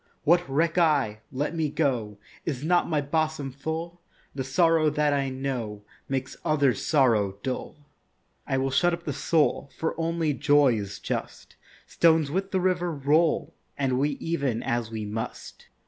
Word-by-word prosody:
What 175 +3 +4
reck 160 +5 +1
I? 140 -10 +2
Let 145 +5 -2
me 160 -3 0
go. 130 -9 -1 0.3
Is 140 -4 -3
not 175 +2 +2
my 155 -3 +1
bosom 155 -1 -1
full? 160 +5 -5 0.3
The 135 - -3
sorrow 165 +3 +3
that 150 0 +1
I 140 -1 0
know 125 -6 -4 0.3
Makes 135 -1 -3
others' 145 -4 +2
sorrow 110 -10 +2
dull. 130 -1 -4 0.7
I 135 - 0
will 135 0 0
shut 175 +5 +3
up 170 0 -4
the 145 - -3
soul, 150 -1 +1
For 160 - -1
only 165 -2 0
joy 145 -2 +4
is 100 -3 -4
just. - - -5 0.3
Stones 160 -3 +3
with 190 +3 -1
the 190 - 0
river 180 -1 +1
roll, 155 +3 +1 0.2
And 130 -2 0
we 145 0 0
ev'n 140 -8 -1
as 120 -1 -1
we 110 -1 -4
must. 110 +2 -6
145 Hz, 160 wpm, -26 LUFS, 130-165 Hz, 0.7 s, What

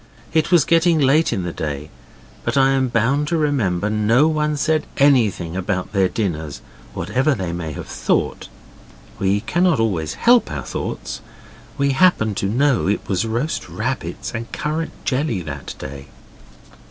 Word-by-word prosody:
It 160 +1 +2
was 170 -5 +5
getting 165 0 +4
late 150 +3 +3
in 95 - -1
the 85 -1 -4
day, 75 0 -5 0.5
but - - -1
I 135 0 +5
am 135 -1 +2
bound 125 +5 +1
to 170 - 0
remember 110 - 0
no 110 +7 +3
one 150 -1 0
said 155 +1 +1
anything 110 - +3
about 95 0 -2
their 95 -2 +3
dinners, 80 -7 -3 0.4
whatever 135 +3 +1
they 95 -5 -3
may 80 -3 -4
have - - -7
thought. - - -1 0.7
We 100 +1 +1
cannot 175 - +2
always 90 -9 -1
help 240 0 +4
our - - -4
thoughts. - - -5 0.6
We 140 -1 +2
happened 135 - +3
to 100 - 0
know 135 0 +2
it 100 - -1
was 95 +1 0
roast 115 - -2
rabbits 110 +10 -4
and 115 0 -5
currant 155 +2 -4
jelly 130 - 0
that 70 -3 -7
day. 70 0 -8
115 Hz, 155 wpm, -20 LUFS, 95-150 Hz, 0.7 s, was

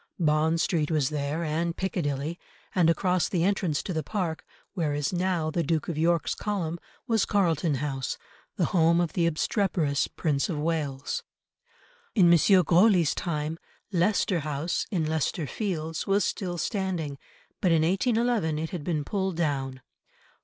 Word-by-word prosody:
Bond 160 0 +2
Street 160 -3 +1
was 150 -5 +1
there 150 +2 -2
and 165 +2 -1
Piccadilly, 160 -4 -2 0.3
and 175 -3 +4
across 180 +1 +1
the 175 -3 0
entrance 185 -5 +1
to 185 - -3
the 160 - -1
Park, 170 -1 -3 0.3
where 160 -7 -1
is 145 +4 -1
now 175 -3 0
the 170 - 0
Duke 160 0 -1
of 170 - -2
York's 165 +1 +1
column, 175 -5 -3 0.3
was 225 -3 +2
Carlton 170 -6 +1
House, 135 -2 -3 0.4
the - - +1
home 170 -1 +4
of 175 -2 0
the 170 -2 +2
obstreperous 165 -3 0
Prince 145 -1 -1
of 165 - -2
Wales. 150 -3 -2 0.9
In 175 -5 +6
M. 170 - +6 0.2
Grosley's 175 -1 +4
time, 160 -1 -3 0.3
Leicester 185 0 +2
House, 150 +3 -2
in 175 -7 0
Leicester 160 +1 -1
Fields, 165 - -3
was 200 +1 +3
still 180 -4 -3
standing, 175 - -2 0.4
but 180 - +3
in 160 -1 +4
1811 215 -2 +1
it 160 +1 -3
had 175 -5 -5
been 150 -3 -1
pulled 190 -1 -1
down. 135 -5 -2
165 Hz, 155 wpm, -27 LUFS, 150-180 Hz, 0.9 s, In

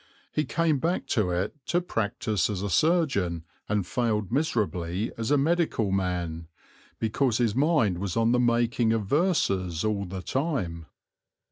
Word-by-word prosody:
He 150 - 0
came 160 0 +1
back 170 +6 -1
to 105 -7 +1
it 90 +4 -1
to 175 - +2
practise 110 - -1
as 100 -2 -3
a 100 - -2
surgeon, 135 - +2 0.3
and 105 -3 +1
failed 105 -2 -1
miserably 105 - -1
as 115 +1 -3
a 145 - +4
medical 155 - +1
man, 90 -4 -2 0.5
because 115 +1 +1
his 115 -4 +1
mind 130 - +2
was 95 -3 -3
on 115 0 +3
the 125 - +3
making 120 -1 +2
of 110 -3 -1
verses 100 - +1
all 105 -2 0
the 95 0 -6
time. 105 - -2
110 Hz, 150 wpm, -27 LUFS, 95-140 Hz, 0.5 s, a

